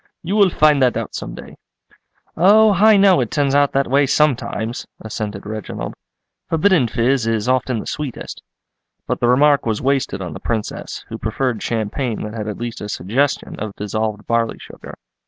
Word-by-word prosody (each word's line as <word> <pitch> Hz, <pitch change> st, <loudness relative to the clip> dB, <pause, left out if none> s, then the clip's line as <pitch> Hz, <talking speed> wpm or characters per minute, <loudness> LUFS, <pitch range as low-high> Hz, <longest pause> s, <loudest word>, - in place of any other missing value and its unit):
You 185 Hz, +5 st, -2 dB
will 200 Hz, -3 st, +5 dB
find 150 Hz, -4 st, +3 dB
that 125 Hz, -2 st, +3 dB
out -, -, -4 dB
some -, -, -6 dB
day." -, -, -11 dB, 0.8 s
"Oh, 210 Hz, +4 st, +6 dB
I 210 Hz, +3 st, +5 dB
know 195 Hz, -2 st, +5 dB
it 120 Hz, -, -2 dB
turns 140 Hz, -2 st, 0 dB
out 145 Hz, 0 st, +3 dB
that 135 Hz, 0 st, +2 dB
way 140 Hz, +2 st, +3 dB
sometimes," 125 Hz, -5 st, 0 dB
assented 105 Hz, -2 st, -5 dB
Reginald. 110 Hz, -1 st, -5 dB, 0.6 s
"Forbidden 165 Hz, -4 st, +3 dB
fizz 120 Hz, +2 st, +1 dB
is 115 Hz, 0 st, 0 dB
often 130 Hz, -1 st, +1 dB
the -, -, -7 dB
sweetest." 145 Hz, -5 st, -6 dB, 0.6 s
But -, -, -2 dB
the 120 Hz, -, +1 dB
remark 140 Hz, +3 st, +4 dB
was 110 Hz, -2 st, 0 dB
wasted 135 Hz, -6 st, 0 dB
on 90 Hz, -4 st, -5 dB
the -, -, -8 dB
Princess, 110 Hz, -2 st, -4 dB
who -, -, -6 dB
preferred 115 Hz, +1 st, -2 dB
champagne 115 Hz, +1 st, -2 dB
that 105 Hz, -, -6 dB
had 110 Hz, -2 st, -5 dB
at 105 Hz, -, -4 dB
least 120 Hz, -1 st, -5 dB
a 105 Hz, -, -6 dB
suggestion 120 Hz, +11 st, -1 dB
of 105 Hz, -1 st, -5 dB
dissolved 105 Hz, +1 st, -3 dB
barley 115 Hz, -1 st, 0 dB
sugar. -, -, -11 dB
125 Hz, 175 wpm, -19 LUFS, 110-145 Hz, 0.8 s, Oh